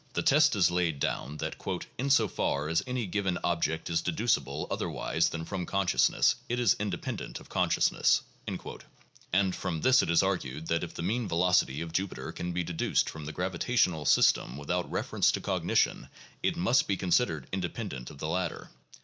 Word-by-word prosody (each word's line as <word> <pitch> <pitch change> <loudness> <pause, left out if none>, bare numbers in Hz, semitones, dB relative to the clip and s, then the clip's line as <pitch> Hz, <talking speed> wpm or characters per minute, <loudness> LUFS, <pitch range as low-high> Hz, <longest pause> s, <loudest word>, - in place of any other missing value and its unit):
The - - -1
test 150 -1 +5
is 90 -4 +3
laid 85 -4 0
down 70 +2 -2
that - - -4 0.4
"in 135 +2 -1
so 120 -6 +5
far 75 -5 -1
as 80 - +2
any 125 -2 -2
given 95 -1 -1
object 80 -2 0
is 85 -1 0
deducible 105 +8 0
otherwise 80 - 0
than 80 0 -5
from 95 -2 -4
consciousness, 100 -2 +2
it 120 +1 0
is 120 -6 +4
independ 100 -4 -3
ent - - -7
of - - -16
consciousness" - - +2 0.2
(p. - - -2
135); - - -9 0.4
and 95 0 +2
from 80 -3 -3
this 130 0 +5
it - - -2
is 85 +2 +4
argued 80 -6 -2
that 85 +1 +1
if 85 - -7
the - - -4
mean 110 +5 -1
velocity 85 -5 +2
of 85 -1 -6
Jupiter 95 +2 -3
can 90 - -4
be 90 +1 -1
deduced 85 -1 0
from 80 -2 -8
the 75 - -5
gravitational 90 -1 0
sys - - +6
tem 65 - -8
without 85 +5 -2
reference - - +1
to - - -1
cognition - - 0 0.3
it - - 0
must 95 +9 +3
be 100 - 0
considered 90 - +1
independent 95 - -4
of - - -12
the 75 - -4
latter. 90 +3 -3
90 Hz, 190 wpm, -29 LUFS, 80-100 Hz, 0.4 s, sys